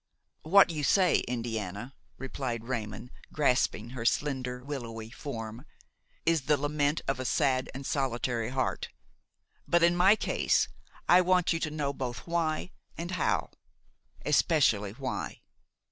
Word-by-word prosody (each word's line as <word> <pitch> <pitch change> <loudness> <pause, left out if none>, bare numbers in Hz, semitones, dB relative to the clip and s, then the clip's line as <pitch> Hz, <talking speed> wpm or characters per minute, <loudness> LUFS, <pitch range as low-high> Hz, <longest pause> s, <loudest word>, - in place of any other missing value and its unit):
'' - - -50
"What 195 -3 +8
you 150 -2 -3
say, 185 +3 +4
Indiana," 115 -1 -4 0.2
replied 130 -3 -4
Raymon, 115 -1 -4 0.2
grasping 125 -5 +1
her 125 -3 -5
slender, 125 -1 -1
willowy 115 -5 -6
form, 115 -3 -6 0.6
"is 165 -5 +2
the 150 -1 +4
lament 145 +1 0
of 135 -1 0
a - - -2
sad 130 +2 +1
and 135 +1 -6
solitary 120 -4 -1
heart; 130 0 -1 0.8
but, 170 0 +3
in 170 +1 +5
my 190 +4 +6
case, - - +1 0.4
I 180 +1 +7
want 180 -1 +3
you 165 - -1
to 155 - -1
know 150 -2 -2
both 125 -4 -5
why 165 0 -1 0.3
and 170 +2 -4
how, 180 -4 0 0.7
especially 135 - +3
why." 130 +2 -4
135 Hz, 135 wpm, -29 LUFS, 120-155 Hz, 0.8 s, What